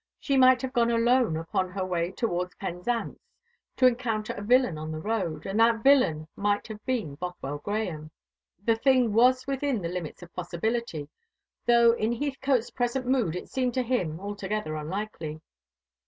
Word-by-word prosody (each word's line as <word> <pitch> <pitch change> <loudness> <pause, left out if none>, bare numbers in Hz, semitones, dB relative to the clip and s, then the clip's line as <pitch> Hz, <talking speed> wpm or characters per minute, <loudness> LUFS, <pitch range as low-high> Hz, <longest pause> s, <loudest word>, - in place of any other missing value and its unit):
She 275 - 0
might 255 -1 +6
have 260 0 -3
gone 235 -2 +3
alone 235 -6 +3
upon 165 +3 -1
her 185 0 -3
way 175 -2 -1
towards 180 -4 -2
Penzance, 195 +6 -3 0.6
to 255 - +4
encounter 235 -4 +1
a - - -7
villain 245 -3 +3
on 155 +1 -5
the 155 - -4
road, 170 -4 -2
and 195 +3 -1
that 225 0 +4
villain 250 - +4
might 205 0 0
have 215 -1 -8
been 230 - -1
Bothwell 145 -3 -5
Grahame. 180 -6 -3 0.6
The 230 - +4
thing 255 -3 +3
was 255 +3 +4
within 275 -2 -1
the 170 - -2
limits 180 -1 -6
of 175 - -14
possibility; 180 -2 -3 0.6
though 235 -1 +6
in 230 0 0
Heathcote's 270 -2 -1
present 245 +1 -1
mood 245 -10 +1
it 180 - -5
seemed 255 -2 -1
to 255 - +1
him 185 -11 -1
altogether 205 -3 -4
unlikely. 160 -1 -5
215 Hz, 165 wpm, -27 LUFS, 175-245 Hz, 0.6 s, might